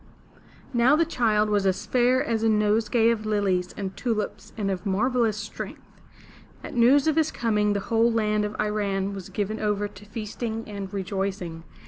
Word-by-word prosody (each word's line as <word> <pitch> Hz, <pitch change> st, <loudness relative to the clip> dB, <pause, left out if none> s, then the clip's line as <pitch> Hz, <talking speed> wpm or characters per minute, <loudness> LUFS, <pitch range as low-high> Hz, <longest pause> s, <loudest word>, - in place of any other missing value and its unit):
Now 245 Hz, +4 st, +5 dB
the 330 Hz, +2 st, +3 dB
child 220 Hz, -8 st, +2 dB
was 200 Hz, -2 st, +2 dB
as 185 Hz, -, 0 dB
fair 250 Hz, +1 st, +3 dB
as 225 Hz, -2 st, -1 dB
a 225 Hz, -, +3 dB
nosegay 220 Hz, +2 st, +3 dB
of 215 Hz, -2 st, -2 dB
lilies 195 Hz, -4 st, 0 dB
and 195 Hz, -2 st, -4 dB
tulips 225 Hz, -4 st, -3 dB
and 200 Hz, -2 st, -1 dB
of 180 Hz, -2 st, -3 dB
marvelous 225 Hz, +2 st, +1 dB
strength. 205 Hz, 0 st, -8 dB, 0.6 s
At -, -, -7 dB
news 255 Hz, +4 st, +5 dB
of 315 Hz, 0 st, +2 dB
his 315 Hz, -1 st, +3 dB
coming 210 Hz, -5 st, +1 dB
the 200 Hz, -, -1 dB
whole 230 Hz, +3 st, +2 dB
land 215 Hz, -2 st, +1 dB
of 210 Hz, 0 st, -3 dB
I 210 Hz, -, 0 dB
ran' 200 Hz, -2 st, -1 dB
was 195 Hz, -3 st, -7 dB
given 210 Hz, +1 st, -2 dB
over 205 Hz, -1 st, 0 dB
to 205 Hz, -, -14 dB
feasting 225 Hz, +1 st, -5 dB
and 200 Hz, -2 st, -6 dB
rejoicing. 190 Hz, -4 st, -3 dB
210 Hz, 175 wpm, -25 LUFS, 200-230 Hz, 0.6 s, Now